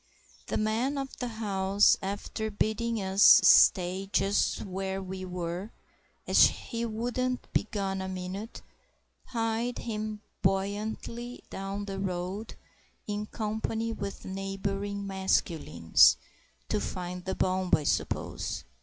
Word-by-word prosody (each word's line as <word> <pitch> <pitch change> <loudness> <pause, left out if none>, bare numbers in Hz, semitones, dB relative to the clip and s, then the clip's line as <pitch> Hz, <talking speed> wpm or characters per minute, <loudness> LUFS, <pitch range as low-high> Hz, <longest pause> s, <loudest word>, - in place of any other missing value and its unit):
The - - -1
man 225 +6 0
of 270 -1 -4
the 250 - -3
house, 200 -3 +3
after 205 +2 -3
bidding 220 +2 -1
us 190 +1 0 0.2
stay 185 +1 +5
just 200 0 +1
where 190 0 -3
we 190 0 -6
were 180 +2 -4 0.6
as - - +7
he 235 -1 -4
wouldn't 245 +3 -2
be 205 - +1
gone 195 -2 -2
a 190 - -4
minute, 190 +4 -6 0.6
hied 230 +1 -1
him 215 -2 -4 0.2
buoyantly 210 +5 -2
down 195 +1 -4
the 195 -1 -5
road 190 +3 -3 0.5
in 210 0 -3
company 220 +1 -2
with 200 -2 -6
neighbouring 195 +1 -3
masculines—to 165 - +2
find 180 - -5
the 190 - -2
bomb, 185 0 0
I 150 - -3
suppose. - - -2
200 Hz, 115 wpm, -29 LUFS, 190-220 Hz, 0.6 s, as